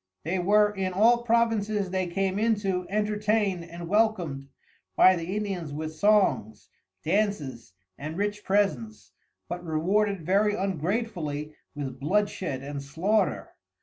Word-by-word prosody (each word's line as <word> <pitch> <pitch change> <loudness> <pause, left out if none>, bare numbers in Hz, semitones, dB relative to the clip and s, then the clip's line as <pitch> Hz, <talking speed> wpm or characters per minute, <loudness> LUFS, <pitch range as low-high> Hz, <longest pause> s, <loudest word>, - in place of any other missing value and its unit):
They 180 +4 -1
were 210 +3 +4
in 190 -2 -3
all 230 +5 +4
Provinces 220 -4 +1
they 185 -1 -1
came 195 +2 -1
into 200 -5 0
entertained 210 -2 0
and 170 0 -8
welcomed 180 -9 +1 0.5
by 185 - +7
the 175 +3 -4
Indians 195 -7 -3
with 155 +2 -5
Songs, 155 - +1 0.3
Dances 155 - -1 0.3
and 155 +3 -5
Rich 205 +1 -2
Presents 115 - -1 0.4
but 175 0 -5
Rewarded 180 +3 0
very 205 +3 +2
ungratefully 175 -5 -2 0.2
with 135 -3 -5
bloodshed 180 -4 -1
and 140 0 -5
Slaughter. 170 +10 0
190 Hz, 120 wpm, -27 LUFS, 155-210 Hz, 0.5 s, by